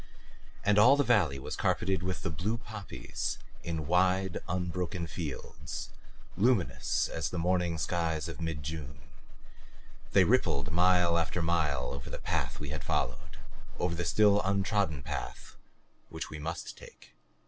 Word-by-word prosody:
And 105 +1 +4
all 125 +6 +8
the 145 - +4
valley 95 - +3
was 65 - -5
carpeted 95 -2 +1
with 90 +1 -3
the - - -1
blue 105 +8 -1
poppies 105 - -5 0.2
in 80 -3 -3
wide, 90 +2 +2
unbroken 90 0 -2
fields, 70 -6 -6 0.4
luminous 110 -1 +2
as 80 -3 -2
the 90 - -5
morning 90 -1 +1
skies 80 -2 -1
of 85 +1 -7
mid 80 -3 -3
June; 70 -4 -6 1.1
they - - +7
rippled 70 +3 +2
mile 90 0 +4
after 85 +1 -1
mile 80 -6 +1
over 70 -2 -7
the - - -5
path - - -2
we 75 - -5
had 75 - -4
followed, 65 +4 -2 0.4
over 90 -1 0
the 85 +1 -2
still 105 +2 +4
untrodden 100 -6 +1
path - - -6 0.5
which 80 0 -6
we 75 - -6
must 80 +3 -4
take. - - -15
85 Hz, 145 wpm, -31 LUFS, 75-95 Hz, 1.1 s, all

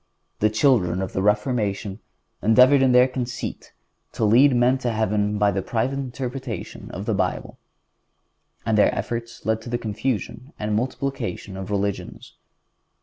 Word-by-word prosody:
The 110 - +3
children 110 -6 +2
of 95 -1 -4
the 95 - -1
Reformation 105 -1 0 0.4
endeavored 125 +5 +6
in 130 -1 +4
their 125 +1 +6
conceit 125 -1 -5 0.4
to 110 - 0
lead 125 +5 +5
men 125 +2 +3
to 125 -2 -1
heaven 105 -1 0
by 105 0 +3
the 95 0 -1
private 125 +7 -1
interpretation 130 0 -6
of - - -6
the - - 0
Bible, - - -2 1.1
and 110 -1 +2
their - - +4
efforts 115 0 -5
led 110 0 0
to 120 - -9
the 120 - 0
confusion 115 +3 -4
and 105 0 -3
the - - +1
multiplication 125 -5 -3
of 95 0 -6
religions. 100 -1 -3
115 Hz, 150 wpm, -23 LUFS, 105-125 Hz, 1.1 s, endeavored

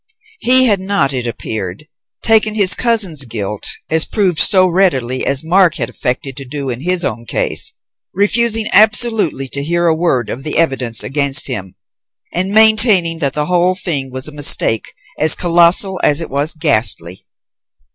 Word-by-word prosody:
He 255 +1 +4
had 205 -5 +1
not, 190 -8 -2
it 125 -2 -4
appeared, 110 +1 -6 0.4
taken 220 -1 +2
his 195 -4 +4
cousin's 200 - +1
guilt 105 -4 -6 0.2
as 160 0 +1
proved 185 -7 -1
so 185 -3 +4
readily 135 -9 -1
as 140 +1 0
Mark 175 +1 +2
had 120 -6 -4
affected 130 +2 -3
to 140 - -6
do 135 0 -4
in 120 +1 -5
his 180 +2 0
own 115 +2 -6
case, - - -1 0.4
refusing 225 +3 +1
absolutely 215 - +2
to 140 +2 -3
hear 170 +3 -2
a 165 -1 +1
word 145 -9 -2
of 130 - -7
the 150 - -1
evidence 130 -9 0
against 140 +5 +1
him, 95 -8 -3 0.6
and 185 +2 0
maintaining 215 -6 +4
that 140 -4 -2
the 150 0 -3
whole 180 +1 0
thing 140 -8 -3
was 130 +2 -7
a - - -9
mistake 145 -6 +2 0.3
as 155 0 +3
colossal 175 +2 +2
as 145 +1 +3
it 165 - -6
was 145 +3 0
ghastly. 100 - -1
160 Hz, 165 wpm, -14 LUFS, 130-190 Hz, 0.6 s, He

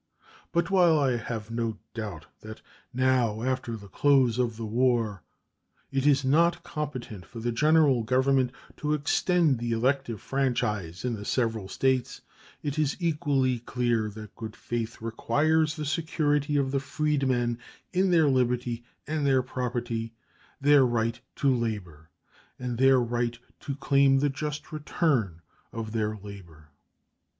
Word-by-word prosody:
But 170 +3 0
while 175 -4 +5
I 135 -4 +2
have 115 -1 -5
no 115 -2 -2 0.2
doubt 105 -9 -6
that 110 0 -10 0.3
now, 125 -4 +1
after 125 -3 -2
the 100 -1 -12
close 130 +2 +3
of 115 -3 0
the 115 - -4
war, 115 -4 +1 0.7
it 135 +1 +1
is 140 -2 +4
not 170 +5 +3
competent 130 - -5
for 115 +6 -10
the 120 +1 -1
General 150 0 +4
Government 130 +2 +2 0.3
to 150 0 0
extend 150 -1 +2
the 120 0 -1
elective 125 -1 0
franchise 105 -10 -1
in 125 - 0
the 105 -2 -5
several 115 -3 -1
States, 130 +3 0 0.4
it 145 +1 -2
is 145 -2 +1
equally 145 -7 +1
clear 120 -2 0
that 105 0 -10
good 110 -1 -7
faith 115 -1 -4
requires 150 +7 +1
the 155 - -4
security 150 -2 0
of 135 -2 +1
the 140 - +1
freedmen 135 -4 0 0.3
in 190 +1 +2
their 165 -4 +4
liberty 125 -2 0 0.2
and 155 +1 -2
their 135 -2 +3
property, 120 -3 -3 0.4
their 145 0 +6
right 115 -2 0 0.2
to 140 -2 +2
labor, 95 -10 -4 0.5
and 125 -2 -4
their 135 0 +6
right 120 0 -1 0.2
to 140 - -5
claim 140 -1 +3
the 145 +2 +2
just 150 +2 -5
return 135 - 0 0.3
of 115 -1 -5
their 110 -1 -1
labor. 90 -7 -12
125 Hz, 140 wpm, -27 LUFS, 115-145 Hz, 0.7 s, their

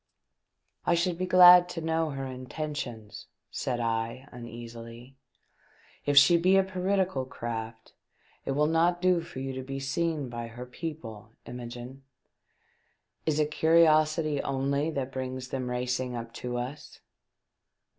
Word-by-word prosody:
" - - -52
I 170 - +4
should 170 0 0
be 185 - -1
glad 180 -1 +8
to 180 - -5
know 160 0 0
her 135 -2 -4
intentions," 130 -4 -6 0.2
said 125 -2 -2
I, 115 +3 -2
uneasily. 120 +1 -10 0.4
" - - -31
If 145 0 +2
she 160 +5 +8
be 185 +3 +4
a 195 - +5
piratical 190 -5 0
craft 115 -2 -6 0.5
it 135 - -2
will 150 +2 +2
not 165 +3 +2
do 180 -1 +3
for 165 -5 -11
you 135 0 -4
to 130 - -5
be 135 +1 -5
seen 150 +1 -1
by 120 -1 -6
her 120 +2 -8
people, 125 -6 -8
Imogene. 125 +2 -8 1.3
Is 155 -1 +1
it 150 0 +1
curiosity 155 -2 +3
only 140 +3 -1
that 135 -4 -3
brings 130 -1 -5
them 130 -2 -3
racing 125 0 -2
up 115 -1 -6
to 125 0 -4
us 135 +5 -6
135 Hz, 145 wpm, -28 LUFS, 125-160 Hz, 1.3 s, glad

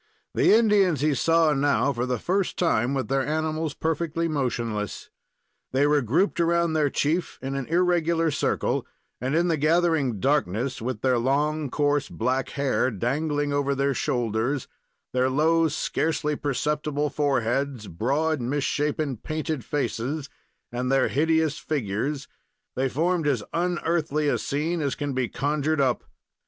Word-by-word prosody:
The - - +4
Indians 205 - +4
he 150 0 +2
saw 165 +2 +3
now 140 0 +2
for 120 0 -2
the 125 -1 0
first 185 - -1
time 135 -6 +1
with 130 - -1
their 135 0 +1
animals 155 0 -2
perfectly 165 +1 -1
motionless. 120 -8 -3 0.6
They 135 +2 +3
were 145 0 +3
grouped 165 - +1
around 170 -1 +2
their 150 -2 +2
chief 160 +6 -1
in 135 +1 -4
an 135 -2 -3
irregular 170 -1 +2
circle, 140 - -1 0.3
and 130 +4 -1
in 170 +2 +3
the 165 -2 +1
gathering 155 - +2
darkness, 130 -1 0
with 120 -2 -3
their 130 -2 +2
long, 145 +4 0
coarse, 145 +1 +1
black 130 0 -1
hair 140 -2 +1
dangling 145 - -1
over 140 -1 +1
their 140 +1 +1
shoulders; 120 +2 -1 0.5
their 130 0 +2
low, 160 +4 +3
scarcely 155 0 -1
perceptible 150 +1 -1
foreheads; 135 -4 0
broad, 140 - 0
misshapen, 145 +1 -1
painted 155 0 -3
faces 140 0 -2 0.4
and 125 +2 -2
their 135 -1 +3
hideous 160 +1 +1
figures, 135 +1 -2 0.5
they 130 +1 0
formed 165 +3 0
as 130 -7 +1
unearthly 165 -3 0
a - - +1
scene 155 +4 -1
as 140 -2 -1
can 145 -2 -3
be 130 -2 -1
conjured 150 +3 0
up. 130 -3 +1
145 Hz, 145 wpm, -25 LUFS, 130-160 Hz, 0.6 s, The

